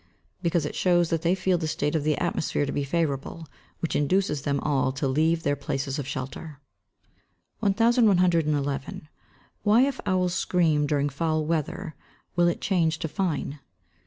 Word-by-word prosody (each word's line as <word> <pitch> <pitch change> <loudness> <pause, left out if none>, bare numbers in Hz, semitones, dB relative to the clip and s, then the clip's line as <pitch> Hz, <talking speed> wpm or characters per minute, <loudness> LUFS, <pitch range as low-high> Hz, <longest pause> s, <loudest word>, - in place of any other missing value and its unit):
_ - - -36 0.4
Because 170 -3 +1
it - - -4
shows 175 -2 +2
that 165 -1 0
they 175 +2 +2
feel 185 -2 +1
the 160 - -2
state 150 -1 -1
of 155 -3 0
the 150 -1 +1
atmosphere 145 - -1
to 140 - -3
be 145 - -1
favourable, 155 +1 -2 0.4
which 165 - -2
induces 150 0 +1
them 140 0 -1
all 135 -3 +1
to 135 +1 -2
leave 160 +4 +1
their 145 - +1
places 135 0 -3
of 140 - -4
shelter. 135 +3 -6 1.0
1111. 180 - +2 0.6
_Why 220 +4 +5
if 275 -2 -3
owls 180 -2 +1
scream 160 -5 +1
during 145 -1 +1
foul 155 +2 -1
weather, 165 +2 -2 0.4
will 175 0 +4
it 175 - -1
change 170 -5 +1
to 160 - -3
fine? 155 -5 -2
160 Hz, 160 wpm, -26 LUFS, 145-180 Hz, 1.0 s, Why